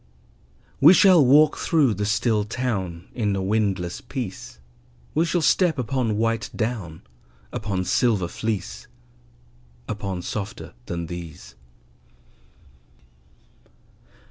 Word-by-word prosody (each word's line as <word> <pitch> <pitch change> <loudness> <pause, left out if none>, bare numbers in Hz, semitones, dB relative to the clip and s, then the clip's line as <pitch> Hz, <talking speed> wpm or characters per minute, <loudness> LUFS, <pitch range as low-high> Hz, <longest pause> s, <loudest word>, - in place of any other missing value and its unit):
We 160 +7 +8
shall 185 -6 +6
walk 150 +4 +5
through 145 -8 +2
the 100 +1 -2
still 105 0 +1
town 100 -7 -3
In 105 -4 -1
a 95 - -2
windless 95 -4 -1
peace; 125 - -7 0.6
We 160 +3 +2
shall 170 -1 0
step 160 +2 +3
upon 120 -3 -1
white 115 0 0
down, 110 -9 -4 0.5
Upon 100 -4 -2
silver 105 -4 +1
fleece, 110 +2 -4 1.0
Upon 100 -4 -4
softer 100 +2 -6
than 85 -1 -4
these. 85 -3 -9
110 Hz, 100 wpm, -23 LUFS, 95-130 Hz, 1.0 s, We